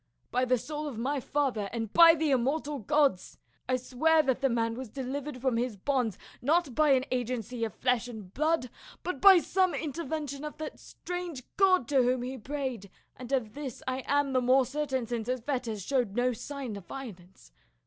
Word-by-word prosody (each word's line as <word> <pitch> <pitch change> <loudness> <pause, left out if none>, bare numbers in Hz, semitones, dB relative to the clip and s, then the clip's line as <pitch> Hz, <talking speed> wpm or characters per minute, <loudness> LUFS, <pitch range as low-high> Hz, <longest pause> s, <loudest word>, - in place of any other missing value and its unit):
By 255 +1 +2
the 255 0 +3
soul 300 +5 -5
of 265 -6 -6
my 275 +5 -1
father, 255 -6 -1
and 225 -3 -4
by 335 -1 +9
the 310 -2 0
immortal 280 +3 0
gods, 275 -4 +1 0.3
I 255 - +3
swear 305 +6 +2
that 265 -2 0
the 270 - +3
man 230 -1 0
was 255 0 -6
delivered 270 +2 -5
from 250 -2 0
his 240 -3 -2
bonds 245 -2 0 0.2
not 310 +1 +2
by 300 0 +4
any 260 0 0
agency 245 -1 -2
of 220 -5 -3
flesh 250 -1 +1
and 215 -6 -9
blood 305 -4 0 0.3
but 350 -7 -4
by 390 -2 +9
some 370 +1 +1
inter 315 +1 -4
vention 290 -1 -4
of 300 - -6
that 310 0 -6
strange 355 -7 -6
God 370 -9 +4
to 275 -3 +4
whom 250 0 +1
he 255 +2 -4
prayed, 260 -5 -4 0.3
and 250 0 -9
of 235 -6 0
this 280 -3 -7
I 260 0 -2
am 285 -1 +2
the 255 - +3
more 255 +1 +4
certain 265 -2 -2
since 230 -1 -4
his 255 -1 -1
fetters 240 -6 -3
showed 245 -7 0
no 250 +1 +2
sign 265 -1 -6
of 185 -4 -12
violence. 190 - -10
260 Hz, 195 wpm, -29 LUFS, 240-290 Hz, 0.3 s, by